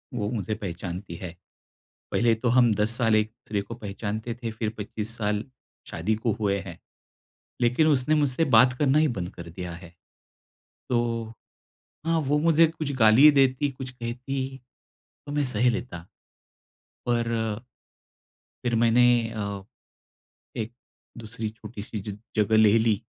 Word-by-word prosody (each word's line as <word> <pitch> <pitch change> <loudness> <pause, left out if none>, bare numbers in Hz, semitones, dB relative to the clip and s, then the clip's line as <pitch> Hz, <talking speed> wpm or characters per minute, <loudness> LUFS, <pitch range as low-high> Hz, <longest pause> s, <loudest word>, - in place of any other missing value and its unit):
वो 105 -3 -1
मुझे 110 -2 -2
पहचानती 90 -2 -6
है। 90 -1 -7 0.8
पहले 120 -1 +3
तो 120 +2 -1
हम 120 -2 +5
10 105 +2 +1
साल 115 -3 +3
एक-दूसरे 110 -1 -1
को 115 +3 -8
पहचानते 110 +1 -4
थे, 115 - -2
फिर 110 0 -2
25 110 +2 -4
साल 105 0 -1 0.5
शादी 105 +7 0
को 115 +1 -1
हुए 100 -2 +1
हैं। 85 - -9 0.8
लेकिन 125 +7 +3
उसने 150 +1 +3
मुझसे 145 +1 +2
बात 125 +2 +6
करना 145 0 +3
ही 155 - +4
बंद 90 0 -3
कर 85 -1 -9
दिया 90 +1 -6
है। 85 0 -11 1.0
तो 115 -2 -1 0.7
हाँ, 165 0 +2
वो 145 0 +1
मुझे 165 +1 +5
कुछ 155 -3 -4
गाली 110 +4 +6
ही 150 - +10
देती, 135 0 +3
कुछ 130 0 -7
कहती 130 +2 -4 0.7
तो 145 - -7
मैं 145 0 +1
सह 125 -1 +2
लेता। 110 -7 -5 1.1
पर 120 -1 +1 1.3
फिर 120 -2 0
मैंने 115 +1 +4 0.3
अ, 100 -3 -4 0.9
एक-दूसरी 115 -1 -7
छोटी-सी 110 -1 -8
ज 100 - -8 0.2
जगह 110 +1 +3
ले 110 0 +6
ली 110 -2 +2
115 Hz, 140 wpm, -26 LUFS, 105-130 Hz, 1.3 s, ही